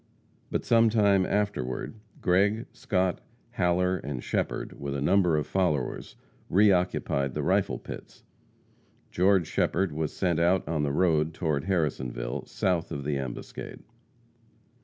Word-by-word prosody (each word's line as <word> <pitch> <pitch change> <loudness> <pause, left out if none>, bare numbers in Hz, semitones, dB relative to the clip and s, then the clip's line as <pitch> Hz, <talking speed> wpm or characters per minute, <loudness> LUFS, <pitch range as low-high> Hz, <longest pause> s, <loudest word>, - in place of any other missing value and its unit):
But - - -2
sometime 105 -5 +4
afterward, 100 -12 -2 0.3
Gregg, 100 +6 +2
Scott, 95 -6 -1 0.3
Haller 90 +1 +1
and 70 -7 -5
Shepherd, - - -3
with 70 0 -4
a - - -2
number 90 +1 +3
of 75 - -1
followers, 75 -6 -1 0.3
re 100 +3 +5
occupied 80 -7 0
the - - -1
rifle - - +1
pits. - - -10 0.9
George 95 -1 +3
Shepherd 95 +3 0
was 75 0 -2
sent 85 -4 0
out 90 +1 +2
on 80 -1 -1
the 70 -1 0
road 80 -1 +2
toward 75 -5 -1
Harrisonville, 65 -10 -2
south 90 -3 -1
of 70 - -4
the 75 +1 -1
ambuscade. 65 -3 -7
85 Hz, 130 wpm, -27 LUFS, 75-95 Hz, 0.9 s, re